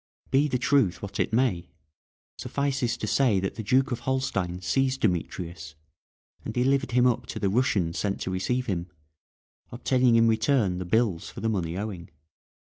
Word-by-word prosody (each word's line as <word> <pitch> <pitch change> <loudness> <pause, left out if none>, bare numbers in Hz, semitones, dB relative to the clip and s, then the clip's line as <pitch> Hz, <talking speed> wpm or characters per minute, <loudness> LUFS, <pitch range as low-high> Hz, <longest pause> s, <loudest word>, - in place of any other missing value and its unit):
Be 140 +2 +4
the 130 - 0
truth 120 -9 +1
what 100 -1 -6
it - - +1
may, 110 -8 +1 0.7
suffices 135 -4 -1
to - - -4
say 120 -8 +2
that 95 0 -2
the - - -6
Duke 130 +5 +2
of 120 - -2
Holstein 100 -10 -2
seized 130 +9 0
Demetrius, 85 -3 -2 0.7
and - - -4
delivered 135 +1 +1
him 125 0 +4
up 125 -1 +1
to - - -5
the 100 - +1
Russians 95 -7 +1
sent 100 -1 -1
to 95 - -3
receive 125 +8 -1
him, 90 -5 -2 0.8
obtaining 125 0 +2
in 115 0 +5
return 110 -4 +2
the 90 - -4
bills 100 -2 0
for - - -9
the 110 - 0
money 90 -5 -2
owing. 100 -4 -5
110 Hz, 170 wpm, -26 LUFS, 90-130 Hz, 0.8 s, in